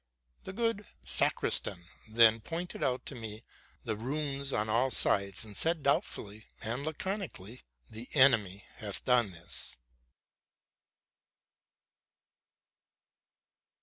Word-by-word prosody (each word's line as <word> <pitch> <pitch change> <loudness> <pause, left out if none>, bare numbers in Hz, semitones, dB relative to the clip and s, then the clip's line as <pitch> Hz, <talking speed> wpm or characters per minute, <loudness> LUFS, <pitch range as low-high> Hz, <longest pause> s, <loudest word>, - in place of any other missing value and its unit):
The - - -5
good 230 -2 -1 0.2
sacristan 85 - +2 0.3
then 115 0 +6
pointed 165 +10 -5
out 130 -1 -1
to - - -4
me 110 -2 -7 0.4
the 110 -3 -2
ruins 140 +3 -2
on 105 -3 0
all 120 +5 +2
sides, 100 -3 +2
and 105 -2 -8
said 165 - +2
doubtfully 110 -6 -1
and 120 +5 -2
laconically, 155 - -5
'* - - -40
The 115 +3 -8
enemy 110 -8 +4
hath 100 -2 -3
done 125 -4 +4
this!" 85 0 -5
120 Hz, 105 wpm, -31 LUFS, 105-140 Hz, 0.4 s, then